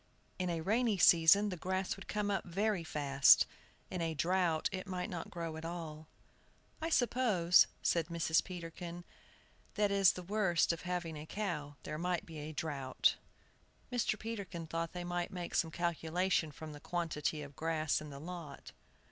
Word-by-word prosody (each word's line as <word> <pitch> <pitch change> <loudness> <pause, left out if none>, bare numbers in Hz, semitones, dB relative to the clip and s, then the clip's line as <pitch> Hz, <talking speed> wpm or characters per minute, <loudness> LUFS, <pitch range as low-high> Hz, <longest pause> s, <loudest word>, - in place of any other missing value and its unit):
In 180 -1 0
a 165 -1 -1
rainy 220 +4 +2
season 170 +4 +6
the 185 - -3
grass 185 +2 -1
would 195 - -11
come 210 -1 -1
up 195 - 0
very 195 +1 0
fast, 140 -3 +5 0.5
in 180 - -3
a 165 -1 -1
drought 170 0 +1
it 190 0 -5
might 180 -1 -3
not 175 -2 -5
grow 165 -2 -5
at 160 - -8
all. 160 -2 -6 0.7
"I 325 - -1
suppose," 225 - +4 0.2
said 165 -2 +2
Mrs. 165 -1 +2
Peterkin, 175 -1 -7 0.7
"that 205 -1 +2
is 195 -1 +5
the 180 - -7
worst 185 -3 +2
of 165 - -6
having 175 -3 -3
a 150 +1 -8
cow, 155 -9 -3
there 155 - -5
might 180 +2 -1
be 165 -4 -8
a 150 +1 -6
drought." 145 -4 0 0.7
Mr. 240 -3 +1
Peterkin 200 -7 -5
thought 165 +1 -3
they 180 -1 -4
might 175 0 -2
make 175 -2 -6
some 165 - +2
calculation 170 0 0
from 155 +1 -9
the 145 - -9
quantity 160 -3 -2
of 145 -1 -11
grass 160 -2 0
in 150 - -8
the 140 - -8
lot. 165 -2 -8
170 Hz, 170 wpm, -34 LUFS, 160-190 Hz, 0.7 s, season